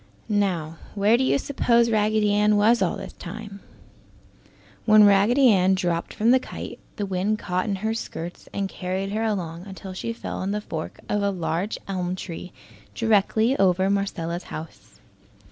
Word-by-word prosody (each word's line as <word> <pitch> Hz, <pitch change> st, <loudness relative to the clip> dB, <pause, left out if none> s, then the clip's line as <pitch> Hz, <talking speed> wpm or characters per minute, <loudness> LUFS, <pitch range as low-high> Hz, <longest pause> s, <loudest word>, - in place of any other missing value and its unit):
Now, 180 Hz, -6 st, 0 dB, 0.2 s
where 205 Hz, +3 st, +4 dB
do 255 Hz, -, +2 dB
you 260 Hz, -, +3 dB
suppose 235 Hz, -4 st, +2 dB
Raggedy 215 Hz, -1 st, +2 dB
Ann 210 Hz, 0 st, +3 dB
was 225 Hz, +3 st, +4 dB
all 185 Hz, -, +1 dB
this -, -, -8 dB
time? 200 Hz, +2 st, -8 dB, 1.3 s
When 215 Hz, -1 st, +7 dB
Raggedy 210 Hz, +7 st, +5 dB
Ann 190 Hz, -2 st, +4 dB
dropped 175 Hz, -2 st, -1 dB
from 225 Hz, +3 st, +2 dB
the 260 Hz, -, +6 dB
kite, -, -, -8 dB, 0.2 s
the 205 Hz, -, -2 dB
wind 195 Hz, +3 st, 0 dB
caught 185 Hz, -3 st, -2 dB
in 205 Hz, -2 st, -1 dB
her 220 Hz, -, +1 dB
skirts 175 Hz, -6 st, -6 dB
and 200 Hz, -1 st, -2 dB
carried 190 Hz, +1 st, -3 dB
her 215 Hz, +2 st, -1 dB
along 180 Hz, -4 st, -3 dB
until 190 Hz, -1 st, -8 dB
she 230 Hz, +5 st, -4 dB
fell 230 Hz, -, -5 dB
in 190 Hz, -, -2 dB
the 210 Hz, -, -1 dB
fork 160 Hz, -6 st, -6 dB
of 205 Hz, -, 0 dB
the 200 Hz, -, +2 dB
large 180 Hz, +2 st, -2 dB
elm 185 Hz, -2 st, -2 dB
tree 180 Hz, 0 st, -7 dB, 0.4 s
directly 225 Hz, +2 st, +2 dB
over 190 Hz, 0 st, +3 dB
Marcella's 180 Hz, -4 st, -2 dB
house. 160 Hz, +1 st, -10 dB
200 Hz, 165 wpm, -24 LUFS, 185-215 Hz, 1.3 s, When